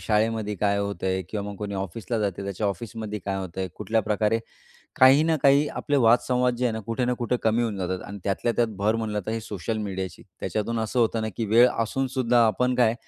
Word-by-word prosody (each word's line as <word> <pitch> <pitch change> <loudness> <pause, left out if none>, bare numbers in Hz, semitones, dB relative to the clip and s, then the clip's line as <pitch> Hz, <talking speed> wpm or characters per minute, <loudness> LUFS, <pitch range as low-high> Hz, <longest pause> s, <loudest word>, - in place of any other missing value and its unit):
शाळेमध्ये 110 -1 0
काय 100 +1 +1
होतंय 95 -2 -1
किंवा 105 -2 -3
मग 100 - -8
कोणी 100 0 -5
ऑफिसला 100 +4 -3
जाते 100 -2 -2
त्याच्या 100 +2 -2
ऑफिसमध्ये 105 0 -4
काय 100 -1 -2
होतंय? 95 0 -4
कुठल्या 110 +2 0
प्रकारे 110 +1 +1 0.6
काही 135 +3 +8
ना 160 0 +2
काही 140 +2 +5
आपले 145 - -1
वादसंवाद 125 +1 +3
जे 125 - -1
आहे 120 - +2
ना 110 - -4
कुठे 115 +2 -1
ना 125 0 +1
कुठे 125 0 0
कमी 115 +2 +2
होऊन 110 -4 -2
जातात 90 0 -2
आणि 100 - -7
त्यातल्या 100 +4 0
त्यात 120 -1 +3
भर 110 +3 +2
म्हटलं 105 -2 -2
तर - - -1
हे 115 - -2
सोशल 105 +1 -4
मीडियाची. 95 -3 -5 0.2
त्याच्यातून 115 +2 -2
असं 110 +3 0
होतं 115 -1 +1
ना 110 - -1
की 115 - -1
वेळ 115 +4 +6
असूनसुद्धा 125 0 +1
आपण 125 +4 +1
काय 120 -2 +3
110 Hz, 210 wpm, -25 LUFS, 100-120 Hz, 0.6 s, काही